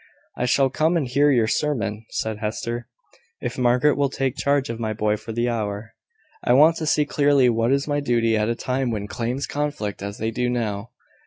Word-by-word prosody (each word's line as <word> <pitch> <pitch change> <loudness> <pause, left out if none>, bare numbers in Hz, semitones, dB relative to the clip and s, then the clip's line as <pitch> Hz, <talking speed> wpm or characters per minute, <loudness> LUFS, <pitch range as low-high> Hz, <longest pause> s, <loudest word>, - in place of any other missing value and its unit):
"I 125 - -1
shall 135 +1 +3
come 160 +5 +2
and 145 -6 -1
hear 140 +4 +3
your 120 -5 +3
sermon," 110 -4 -1
said 110 -1 -3
Hester, 115 +3 -3 0.5
"if 120 - -4
Margaret 125 +4 +3
will 140 -1 +1
take 135 -1 -2
charge 140 -1 +1
of 115 0 -5
my 110 -2 -2
boy 105 0 0
for 115 - -8
the 120 +2 0
hour. 110 -2 -3 0.5
I 120 - +3
want 155 +5 +6
to 155 - -3
see 150 0 +3
clearly 140 -3 +3
what 115 +1 +1
is 140 +1 +1
my 145 -1 0
duty 115 -5 +1
at 105 +1 +1
a 115 - 0
time 130 +1 -1
when 105 -3 -3
claims 120 +5 -3
conflict 145 -10 -3
as 100 +1 -5
they 110 +1 -2
do 125 +2 -1
now." 110 -3 -2
120 Hz, 210 wpm, -23 LUFS, 110-140 Hz, 0.5 s, want